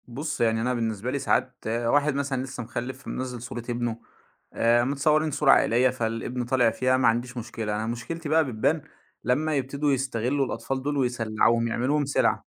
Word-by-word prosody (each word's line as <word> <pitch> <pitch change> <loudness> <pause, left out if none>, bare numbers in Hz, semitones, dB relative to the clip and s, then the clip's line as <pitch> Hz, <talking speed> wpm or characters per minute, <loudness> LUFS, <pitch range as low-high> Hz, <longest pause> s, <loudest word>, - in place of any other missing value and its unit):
بُصّ 135 +5 -4
يعني 115 -1 +2
أنا 125 +2 0
بالنسبة 115 0 -2
لي 140 - -1
ساعات 130 -1 +1
واحد 120 +6 +2
مثلًا 140 -2 -1
لسّه 130 -2 -6
مخلّف، 120 +3 -6
منزّل 125 -2 -4
صورة 120 -1 -6
ابنه، 120 -1 -2 0.5
آآ 120 +1 +3
متصورين 150 +4 +2
صورة 140 0 +4
عائلية 125 0 +4
فالابن 120 0 -3
طالع 125 -2 +3
فيها 130 +3 +1
ما 130 - +3
عنديش 120 +2 0
مشكلة، 110 -2 -4
أنا 110 +1 -2
مشكلتي 145 +8 -5
بقى 160 +1 +4
بتبان 135 +6 0 0.4
لمّا 150 +5 +1
يبتدوا 140 +2 0
يستغلّوا 130 +1 0
الأطفال 130 +1 -3
دُول 145 +1 -1
ويسلّعوهم، 115 -2 +1
يعملوهم 135 +6 0
سلعة. 140 - +1
125 Hz, 165 wpm, -26 LUFS, 115-140 Hz, 0.5 s, صورة